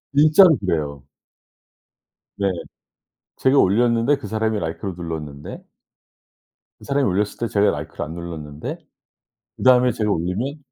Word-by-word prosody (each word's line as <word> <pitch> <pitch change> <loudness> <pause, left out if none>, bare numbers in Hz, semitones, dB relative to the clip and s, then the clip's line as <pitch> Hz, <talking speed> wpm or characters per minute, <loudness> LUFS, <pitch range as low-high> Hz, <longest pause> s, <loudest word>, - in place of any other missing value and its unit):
진짜로 155 +4 +7
그래요. 75 -7 -2 1.3
네. 100 -1 0 0.9
제가 135 +1 +3
올렸는데 115 +6 +3
그 105 - -8
사람이 110 0 -1
라이크를 85 +4 -4
눌렀는데 75 -4 -7 1.2
그 - - -14
사람이 140 -1 +1
올렸을 100 +2 -1
때 120 - -1
제가 105 -1 +2
라이크를 75 +2 -5
안 80 - -8
눌렀는데 80 -3 -7 0.8
그다음에 125 -1 +5
제가 105 -3 -1
올리면 100 - -2
100 Hz, 295 characters per minute, -21 LUFS, 80-125 Hz, 1.3 s, 진짜로